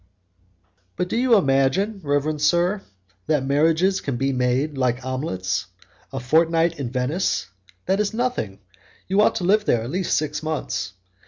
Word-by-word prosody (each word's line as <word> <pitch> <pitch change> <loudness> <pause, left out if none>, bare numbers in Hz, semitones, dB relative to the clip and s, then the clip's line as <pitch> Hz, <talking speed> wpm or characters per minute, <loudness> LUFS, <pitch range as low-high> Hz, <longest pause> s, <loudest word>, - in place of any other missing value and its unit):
"But 180 - -2
do - - -2
you 245 0 +4
imagine, 180 +6 +2
reverend 145 +1 0
sir, 175 +6 +2 0.5
that 150 -4 +1
marriages 160 +7 +2
can 135 -4 -3
be 135 +2 0
made 130 +4 0
like 125 -1 0
omelets? 130 - -2 0.4
A 135 - -4
fortnight 165 +4 +2
in 130 -4 -3
Venice, 130 - -1 0.4
that 190 +2 +1
is 210 -1 +1
nothing; 230 - -2 0.5
you 195 +2 +3
ought - - +3
to - - -2
live 210 +4 +3
there 115 - +2
at 120 - -5
least 185 +1 0
six 150 -1 -2
months. 145 - -3
150 Hz, 155 wpm, -23 LUFS, 130-185 Hz, 0.5 s, you